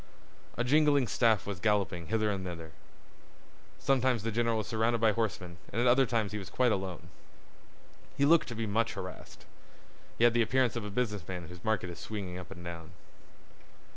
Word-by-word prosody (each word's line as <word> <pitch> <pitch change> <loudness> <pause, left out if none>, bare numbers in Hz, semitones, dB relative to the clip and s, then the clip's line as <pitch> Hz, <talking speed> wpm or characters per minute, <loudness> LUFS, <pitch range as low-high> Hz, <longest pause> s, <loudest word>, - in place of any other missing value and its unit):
A 120 - +1
jingling 145 0 +4
staff 110 -3 +2
was 100 -3 -5
galloping 95 -5 0
hither 110 -1 +1
and 95 -2 -3
thither. 85 -3 -7 1.1
Sometimes 130 -4 +1
the 115 - -1
general 115 0 +1
was 110 - -2
surrounded 115 +2 +1
by 110 -1 +4
horsemen 95 -6 -3
and 115 - -2
at 120 - +2
other 130 +1 +5
times 110 -4 0
he 105 - -3
was 95 - -8
quite 125 -2 +2
alone. 95 -4 -3 1.1
He 140 - +4
looked 165 +2 +5
to 120 - -6
be 115 0 -2
much 110 +2 0
harassed. 95 -2 -8 0.7
He - - +1
had 120 -1 +6
the 120 - +3
appearance 125 +1 +2
of 120 - -3
a 105 - -5
business 105 -5 -2
man 90 -3 -6
whose 90 0 -11
market 110 -5 0
is 85 - -10
swinging 95 -4 -5
up 90 - -10
and 90 -2 -10
down. 85 0 -8
110 Hz, 190 wpm, -31 LUFS, 90-120 Hz, 1.1 s, had